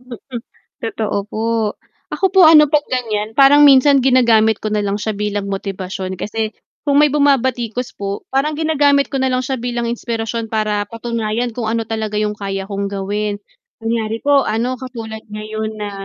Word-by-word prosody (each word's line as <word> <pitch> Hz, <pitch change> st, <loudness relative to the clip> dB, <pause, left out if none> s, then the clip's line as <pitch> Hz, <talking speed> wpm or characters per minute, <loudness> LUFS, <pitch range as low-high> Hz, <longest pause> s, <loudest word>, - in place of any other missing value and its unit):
Mm, 250 Hz, 0 st, -9 dB, 0.4 s
totoo 220 Hz, -2 st, -2 dB
po, 220 Hz, -, -3 dB, 0.7 s
ako -, -, -3 dB
po 380 Hz, -, +6 dB
ano 305 Hz, -1 st, +8 dB
'pag 300 Hz, 0 st, +2 dB
ganiyan, 220 Hz, -4 st, -2 dB
parang 280 Hz, +2 st, +7 dB
minsan 275 Hz, -1 st, +6 dB
ginagamit 235 Hz, -4 st, +4 dB
ko 215 Hz, -, -4 dB
na 210 Hz, -, 0 dB
lang 205 Hz, 0 st, -1 dB
siya 215 Hz, 0 st, -3 dB
bilang 205 Hz, -1 st, -2 dB
motibasyon, 190 Hz, -1 st, -5 dB
kasi 215 Hz, +3 st, -3 dB, 0.3 s
kung 285 Hz, 0 st, +3 dB
may 300 Hz, -, +6 dB
bumabatikos 255 Hz, -4 st, 0 dB
po, 200 Hz, 0 st, -5 dB
parang 275 Hz, +3 st, 0 dB
ginagamit 290 Hz, -3 st, +2 dB
ko -, -, -4 dB
na 265 Hz, -1 st, 0 dB
lang 255 Hz, -, +1 dB
siya 260 Hz, +1 st, -2 dB
bilang 240 Hz, -1 st, -3 dB
inspirasyon, 230 Hz, -1 st, -3 dB
para 210 Hz, -1 st, 0 dB
patunayan 230 Hz, 0 st, -3 dB
kung 225 Hz, -2 st, -2 dB
ano 225 Hz, -1 st, -1 dB
talaga 220 Hz, -1 st, -3 dB
'yung 210 Hz, 0 st, -1 dB
kaya 195 Hz, -1 st, -4 dB
kong 200 Hz, -1 st, -3 dB
gawin. 205 Hz, +1 st, -3 dB, 0.4 s
Kunyari 225 Hz, -1 st, -2 dB
po 285 Hz, -1 st, +3 dB
ano, 235 Hz, +4 st, -1 dB
katulad 225 Hz, -4 st, -8 dB
ngayon 215 Hz, +1 st, -4 dB
na 210 Hz, -1 st, -4 dB
225 Hz, 170 wpm, -18 LUFS, 210-260 Hz, 0.7 s, ano